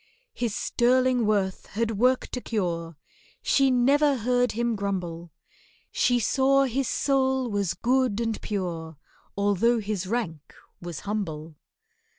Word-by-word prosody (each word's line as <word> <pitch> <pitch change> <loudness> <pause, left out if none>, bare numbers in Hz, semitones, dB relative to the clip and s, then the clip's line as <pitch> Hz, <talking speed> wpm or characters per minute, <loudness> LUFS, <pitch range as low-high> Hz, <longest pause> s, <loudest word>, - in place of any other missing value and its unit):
His 235 -4 -2
sterling 250 -1 +2
worth 195 -3 0
had 225 +2 -2
worked 255 +2 +2
a 250 - -4
cure, 170 -8 -3 0.5
She 275 -1 +3
never 275 +3 +3
heard 245 +2 +1
him 235 +1 0
grumble; 175 -4 -4 0.6
She 245 -1 +2
saw 270 +4 +3
his 265 0 -1
soul 265 -3 +1
was 200 -4 -1
good 250 -3 +1
and 225 -2 -2
pure, 170 -6 -4 0.4
Although 205 +4 +2
his 205 -4 -3
rank 185 -9 -4 0.3
was 175 -3 -6
humble. 165 -7 -4
225 Hz, 125 wpm, -26 LUFS, 190-250 Hz, 0.6 s, She